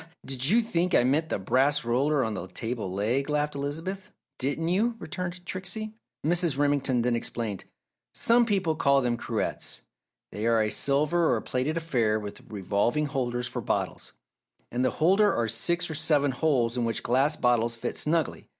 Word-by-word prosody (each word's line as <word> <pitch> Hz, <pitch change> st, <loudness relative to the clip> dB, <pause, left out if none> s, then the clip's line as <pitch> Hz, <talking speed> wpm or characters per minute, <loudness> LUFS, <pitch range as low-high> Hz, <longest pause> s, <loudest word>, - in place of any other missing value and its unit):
"Ha, -, -, -16 dB
ha! 165 Hz, -, -27 dB
Did 135 Hz, 0 st, -2 dB
you 230 Hz, +5 st, +5 dB
think 180 Hz, -6 st, 0 dB
I -, -, +5 dB
meant 150 Hz, +6 st, +1 dB
the -, -, 0 dB
brass 135 Hz, +8 st, +1 dB
roller 135 Hz, +4 st, +2 dB
on 110 Hz, -2 st, -2 dB
the 95 Hz, -2 st, -5 dB
table 115 Hz, 0 st, -4 dB
leg?" 115 Hz, +9 st, -1 dB
laughed 150 Hz, 0 st, 0 dB
Elizabeth. 165 Hz, +8 st, -5 dB, 0.3 s
"Didn't 145 Hz, +5 st, -1 dB
you?" 220 Hz, +6 st, +1 dB
returned 180 Hz, -1 st, -6 dB
Trixie. 195 Hz, +4 st, -5 dB, 0.3 s
Mrs. 170 Hz, -3 st, +3 dB
Remington 140 Hz, -4 st, +1 dB
then 120 Hz, 0 st, +1 dB
explained. 115 Hz, -4 st, -4 dB, 0.5 s
"Some 235 Hz, 0 st, +4 dB
people 190 Hz, -7 st, +1 dB
call 140 Hz, -2 st, +3 dB
them 120 Hz, -2 st, 0 dB
cruets. -, -, -3 dB, 0.5 s
They 105 Hz, +2 st, -3 dB
are 115 Hz, -1 st, +3 dB
a 105 Hz, -1 st, +1 dB
silver, 150 Hz, +4 st, +3 dB
or 120 Hz, -, +2 dB
plated 135 Hz, +6 st, -2 dB
affair, 120 Hz, -10 st, +1 dB
with 105 Hz, -1 st, -8 dB
revolving 105 Hz, +8 st, 0 dB
holders 125 Hz, -3 st, -2 dB
for -, -, -4 dB
bottles. -, -, -3 dB, 0.6 s
In 120 Hz, -, -1 dB
the 130 Hz, -, +3 dB
holder 195 Hz, +5 st, +3 dB
are 115 Hz, -1 st, 0 dB
six 170 Hz, +11 st, +1 dB
or 160 Hz, -, -4 dB
seven 150 Hz, -2 st, +2 dB
holes 125 Hz, -4 st, +1 dB
in 120 Hz, -, 0 dB
which 115 Hz, -1 st, -2 dB
glass 135 Hz, +5 st, +2 dB
bottles 120 Hz, -3 st, +1 dB
fit 115 Hz, -, -4 dB
snugly. 160 Hz, -1 st, -1 dB
140 Hz, 180 wpm, -27 LUFS, 120-165 Hz, 0.6 s, you